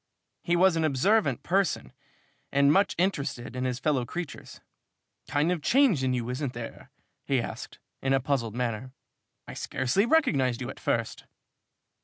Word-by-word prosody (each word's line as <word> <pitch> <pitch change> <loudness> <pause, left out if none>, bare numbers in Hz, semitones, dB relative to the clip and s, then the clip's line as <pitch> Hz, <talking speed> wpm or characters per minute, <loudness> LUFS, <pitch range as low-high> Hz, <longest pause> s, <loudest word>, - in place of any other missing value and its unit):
He 175 - +1
was 180 0 +4
an 165 - +1
observant 160 - +2
person 185 -7 0 0.6
and 140 +1 +4
much 200 +1 +3
interested 140 -9 -1
in 125 0 -2
his 125 -1 -1
fellow 135 -1 +1
creatures. 165 +6 -7 0.7
"Kind 150 +4 +1
of 175 -3 -1
change 245 - +3
in 130 - +1
you, 120 -2 -2
isn't 125 +1 -3
there?" 115 -1 -8 0.3
he 135 -2 +1
asked, 115 - -6 0.2
in 135 - 0
a 135 - +4
puzzled 125 -5 -1
manner. 125 +1 -3 0.5
"I - - -7
scarcely 130 - 0
recognized 140 - +2
you 130 0 -4
at - - -13
first." 115 -1 -2
140 Hz, 155 wpm, -28 LUFS, 125-175 Hz, 0.7 s, was